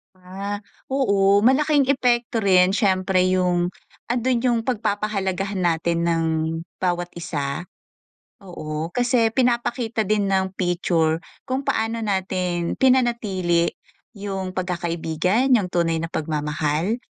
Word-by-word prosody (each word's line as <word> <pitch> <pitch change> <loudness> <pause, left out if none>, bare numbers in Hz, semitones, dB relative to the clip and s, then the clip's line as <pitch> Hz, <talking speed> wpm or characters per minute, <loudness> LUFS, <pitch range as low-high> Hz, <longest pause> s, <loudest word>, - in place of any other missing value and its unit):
Ah, 195 +3 -6 0.3
oo, 200 -7 +3
malaking 275 +4 +3
epekto 240 -4 +1
rin 185 -1 +4
siyempre 190 -3 +2
yung, 180 -1 +1 0.4
andun 245 0 0
yung 240 -2 +2
pagpapahalagahan 205 -4 -1
natin 170 0 +1
ng 165 -1 +1 0.5
bawat 175 -1 -1
isa. 145 -4 -3 0.8
Oo 155 -4 -5
kasi 245 -2 +2
pinapakita 235 -3 0
din 205 -1 +1
ng 190 0 0
picture 175 -3 +1 0.2
kung 265 +1 -3
paano 225 +1 0
natin 185 -4 -1
pinanatili 215 -10 +2 0.5
yung 195 -2 -5
pagkakaibigan, 180 - 0
yung 210 -7 +3
tunay 165 -2 0
na 165 - -3
pagmamahal, 150 +4 -1
190 Hz, 105 wpm, -22 LUFS, 175-230 Hz, 0.8 s, rin